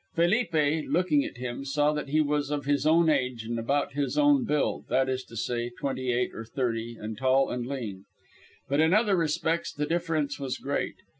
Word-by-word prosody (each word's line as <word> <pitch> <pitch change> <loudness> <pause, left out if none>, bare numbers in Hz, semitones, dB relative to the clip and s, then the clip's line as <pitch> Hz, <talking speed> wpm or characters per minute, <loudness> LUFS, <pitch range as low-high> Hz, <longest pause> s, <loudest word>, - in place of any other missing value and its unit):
Felipe, 165 -5 +2
looking 160 -4 +2
at - - -7
him, 125 +1 -5
saw 145 +2 +1
that 150 -2 -4
he 155 +2 +3
was 145 -1 0
of 145 -2 -2
his 145 +1 +1
own 165 +1 +5
age 130 -6 0
and 115 +1 -3
about 140 +4 0
his 145 - -2
own 290 -2 +5
build 150 -8 -1
that 130 0 +2
is 130 0 -2
to 115 - -11
say, 120 +2 -2
twenty 130 +1 -3
eight 125 +1 0
or 110 - -6
thirty, 115 -1 -3
and 110 +1 -6
tall 130 +1 +3
and 125 -1 -3
lean. 110 -8 -5 0.6
But 140 +2 +1
in 160 +4 +4
other 210 -2 +3
respects 165 0 0
the 150 - -2
difference 160 -3 -1
was 135 -2 -3
great. 140 - -2
140 Hz, 200 wpm, -27 LUFS, 125-160 Hz, 0.6 s, own